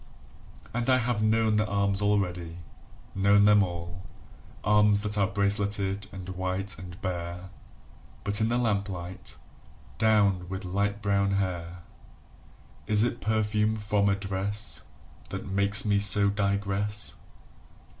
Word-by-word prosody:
And 120 Hz, +2 st, -2 dB
I 130 Hz, -, +5 dB
have 120 Hz, -3 st, -1 dB
known 110 Hz, 0 st, +2 dB
the 105 Hz, 0 st, +1 dB
arms 100 Hz, -1 st, 0 dB
already, 90 Hz, -5 st, -1 dB, 0.6 s
known 100 Hz, +1 st, +4 dB
them 105 Hz, 0 st, +6 dB
all 85 Hz, -1 st, -4 dB, 0.6 s
Arms 105 Hz, 0 st, +4 dB
that 105 Hz, 0 st, -2 dB
are 100 Hz, -2 st, +2 dB
braceleted 100 Hz, 0 st, -1 dB
and 95 Hz, -2 st, -9 dB
white 95 Hz, +1 st, -3 dB
and 90 Hz, +1 st, -10 dB
bare 90 Hz, 0 st, -5 dB, 0.7 s
[But 100 Hz, +2 st, +1 dB
in 110 Hz, -, +2 dB
the 120 Hz, -, +1 dB
lamplight, 100 Hz, -6 st, -3 dB, 0.6 s
downed 100 Hz, -5 st, +2 dB
with 95 Hz, +1 st, -5 dB
light 100 Hz, +3 st, -2 dB
brown 100 Hz, -1 st, +1 dB
hair!] 90 Hz, -3 st, -3 dB, 1.0 s
Is 105 Hz, 0 st, +4 dB
it 120 Hz, 0 st, -2 dB
perfume 110 Hz, 0 st, 0 dB
from 105 Hz, -1 st, +1 dB
a 100 Hz, -, +2 dB
dress 100 Hz, +2 st, -2 dB, 0.5 s
That 95 Hz, -, -6 dB
makes 100 Hz, +2 st, +4 dB
me 100 Hz, -1 st, +2 dB
so 100 Hz, 0 st, +5 dB
digress? 100 Hz, +1 st, -1 dB
100 Hz, 125 wpm, -27 LUFS, 95-105 Hz, 1.0 s, them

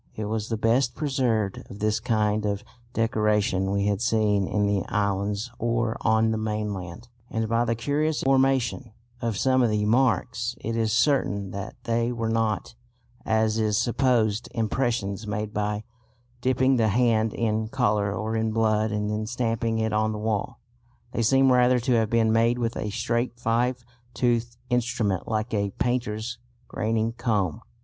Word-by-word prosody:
It 110 Hz, -, -4 dB
was 110 Hz, 0 st, -3 dB
the 115 Hz, -, -1 dB
best 120 Hz, +3 st, +2 dB
preserved 125 Hz, -9 st, 0 dB
of 100 Hz, -, -9 dB
this 105 Hz, +1 st, 0 dB
kind 110 Hz, -3 st, +1 dB
of 100 Hz, -1 st, -2 dB, 0.3 s
decoration 105 Hz, -4 st, +1 dB
we 100 Hz, 0 st, 0 dB
had 100 Hz, 0 st, 0 dB
seen 105 Hz, -4 st, +2 dB
in 105 Hz, -1 st, +1 dB
the 100 Hz, -1 st, +1 dB
islands 100 Hz, +2 st, -1 dB
or 115 Hz, -1 st, 0 dB
on 110 Hz, 0 st, +3 dB
the 110 Hz, -, -1 dB
mainland, 105 Hz, -1 st, -4 dB, 0.2 s
and 110 Hz, 0 st, -1 dB
by 115 Hz, +2 st, +1 dB
the 115 Hz, 0 st, 0 dB
curious 145 Hz, +6 st, 0 dB
formation 135 Hz, -3 st, +1 dB, 0.3 s
of 115 Hz, -4 st, -1 dB
some 130 Hz, +2 st, +3 dB
of 120 Hz, -, +3 dB
the 105 Hz, -1 st, 0 dB
marks 120 Hz, 0 st, +1 dB
it 115 Hz, +1 st, -3 dB
is 110 Hz, -1 st, +1 dB
certain 115 Hz, -6 st, +1 dB
that 100 Hz, +2 st, -6 dB
they 115 Hz, +1 st, 0 dB
were 115 Hz, -2 st, -2 dB
not, 110 Hz, -3 st, -1 dB, 0.5 s
as 110 Hz, 0 st, +2 dB
is 105 Hz, -2 st, +1 dB
supposed, 115 Hz, -2 st, +1 dB
impressions 110 Hz, -3 st, -1 dB
made 105 Hz, 0 st, -3 dB
by 105 Hz, 0 st, -1 dB, 0.6 s
dipping 130 Hz, +1 st, +2 dB
the 115 Hz, -2 st, +3 dB
hand 110 Hz, 0 st, +2 dB
in 110 Hz, -1 st, 0 dB
colour 105 Hz, -2 st, +1 dB
or 110 Hz, +2 st, -3 dB
in 110 Hz, 0 st, 0 dB
blood 110 Hz, -1 st, +1 dB
and 105 Hz, 0 st, -1 dB
then 110 Hz, 0 st, -2 dB
stamping 115 Hz, -1 st, -1 dB
it 110 Hz, -1 st, 0 dB
on 110 Hz, 0 st, +1 dB
the -, -, -4 dB
wall. 105 Hz, -1 st, -2 dB, 0.5 s
They 120 Hz, -, -1 dB
seem 135 Hz, +3 st, +4 dB
rather 125 Hz, 0 st, +4 dB
to 125 Hz, +2 st, -1 dB
have 110 Hz, -2 st, +2 dB
been 115 Hz, -1 st, +3 dB
made 115 Hz, +2 st, +3 dB
with 115 Hz, -2 st, -2 dB
a 105 Hz, -, -3 dB
straight 120 Hz, +3 st, -2 dB
five 120 Hz, +2 st, 0 dB, 0.3 s
toothed 120 Hz, -1 st, 0 dB
instrument 115 Hz, -6 st, 0 dB
like 110 Hz, +1 st, -2 dB
a 100 Hz, -1 st, 0 dB
painter's 120 Hz, -1 st, -2 dB, 0.3 s
graining 110 Hz, +1 st, -1 dB
comb. 105 Hz, -, -1 dB
110 Hz, 165 wpm, -25 LUFS, 105-120 Hz, 0.6 s, seem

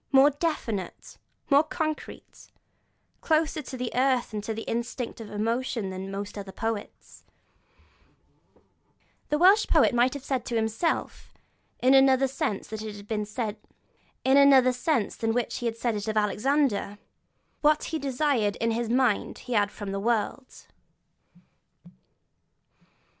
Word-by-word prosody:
More 275 Hz, +1 st, +6 dB
definite, 270 Hz, -, -4 dB, 0.3 s
more 280 Hz, +1 st, +7 dB
concrete, 310 Hz, 0 st, -5 dB, 0.7 s
closer 315 Hz, -1 st, +1 dB
to 260 Hz, -1 st, -8 dB
the 250 Hz, -1 st, -3 dB
earth 255 Hz, -2 st, +1 dB
and 210 Hz, -1 st, -4 dB
to 225 Hz, 0 st, -5 dB
instinctive 235 Hz, -1 st, -4 dB
emotion 225 Hz, -1 st, -2 dB
than 190 Hz, +1 st, -6 dB
most 200 Hz, +1 st, -6 dB
other 195 Hz, -1 st, -8 dB
poets, 225 Hz, 0 st, -6 dB, 2.1 s
the 300 Hz, -, +1 dB
Welsh 385 Hz, +6 st, +5 dB
poet -, -, +4 dB
might 245 Hz, +3 st, +2 dB
have 280 Hz, -, -7 dB
said 265 Hz, -3 st, -1 dB
of -, -, -14 dB
himself, 225 Hz, +9 st, -2 dB, 0.5 s
in 260 Hz, +1 st, +5 dB
another 270 Hz, 0 st, +5 dB
sense 260 Hz, -6 st, -3 dB
than 220 Hz, -, -6 dB
that 215 Hz, -, -6 dB, 2.4 s
in 225 Hz, -1 st, +1 dB
which 245 Hz, -2 st, -1 dB
he 235 Hz, -1 st, -1 dB
said 230 Hz, 0 st, -2 dB
it 205 Hz, +1 st, -4 dB
of 220 Hz, 0 st, -1 dB
Alexander: 210 Hz, 0 st, +1 dB, 0.6 s
'What 300 Hz, 0 st, +3 dB
he 320 Hz, -, -3 dB
desired 265 Hz, -6 st, 0 dB
in 230 Hz, 0 st, -1 dB
his 230 Hz, 0 st, -2 dB
mind 245 Hz, -3 st, +1 dB
he 250 Hz, -, -4 dB
had 205 Hz, -3 st, +2 dB
from 205 Hz, -2 st, -7 dB
the 195 Hz, -, -2 dB
world.' 235 Hz, +4 st, -2 dB
240 Hz, 120 wpm, -27 LUFS, 215-275 Hz, 2.4 s, more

